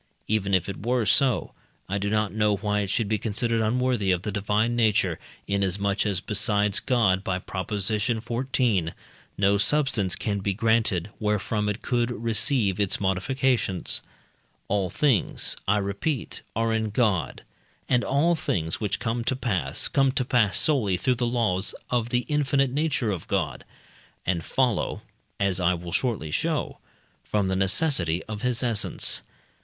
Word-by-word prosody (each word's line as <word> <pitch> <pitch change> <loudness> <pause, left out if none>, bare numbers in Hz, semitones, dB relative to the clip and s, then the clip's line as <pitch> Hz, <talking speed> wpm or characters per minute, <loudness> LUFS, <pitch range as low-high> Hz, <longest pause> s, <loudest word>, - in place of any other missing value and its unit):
Even 100 -2 +1
if 90 - 0
it 100 - -6
were 120 0 +1
so, 125 +4 +2 0.3
I 100 +1 -2
do 100 +1 -1
not 105 -1 0
know 105 -1 +2
why 105 +1 -1
it 100 -2 -2
should 110 +2 0
be 110 0 0
considered 115 +2 0
unworthy 120 -2 +1
of 90 -1 +1
the 105 - -3
divine 105 +4 0
nature, 110 -3 +2 0.3
inasmuch 100 +1 0
as 100 -3 0
besides 105 0 +1
God 100 -7 +2
(by 95 -2 -1
Prop. 95 0 -5
xiv.) 110 -1 0 0.4
no 100 +1 +3
substance 110 -8 +2
can 100 -2 -2
be 100 0 -1
granted, 110 -4 +1
wherefrom 105 0 0
it 105 +2 -4
could 120 -1 0
receive 115 -3 0
its 100 -3 +1
modifications. 100 +1 0 0.7
All 100 -2 0
things, 130 - +1
I 105 +2 +3
repeat, 105 +7 -3
are 115 0 +1
in 110 -1 0
God, 105 -5 0 0.4
and 125 -1 +2
all 150 +6 +2
things 85 - -2
which 105 - -1
come 115 0 -2
to 130 - +1
pass, 120 -9 -1
come 135 -1 +2
to 125 - 0
pass 115 -5 +2
solely 110 -12 +1
through 130 +8 +1
the 120 0 -1
laws 110 -5 0 0.2
of 120 -1 0
the 125 0 0
infinite 140 -3 +1
nature 145 -5 0
of 90 -5 -5
God, 80 -11 -1 0.6
and 85 -2 0
follow 125 +2 0 0.4
(as 100 -2 +1
I 90 0 +2
will 85 0 -7
shortly 105 -9 -1
show) - - -1 0.4
from 100 -3 0
the 95 - 0
necessity 95 - +1
of 105 -1 -7
his 125 -1 -1
essence. 115 -5 +1
105 Hz, 155 wpm, -25 LUFS, 95-120 Hz, 0.7 s, no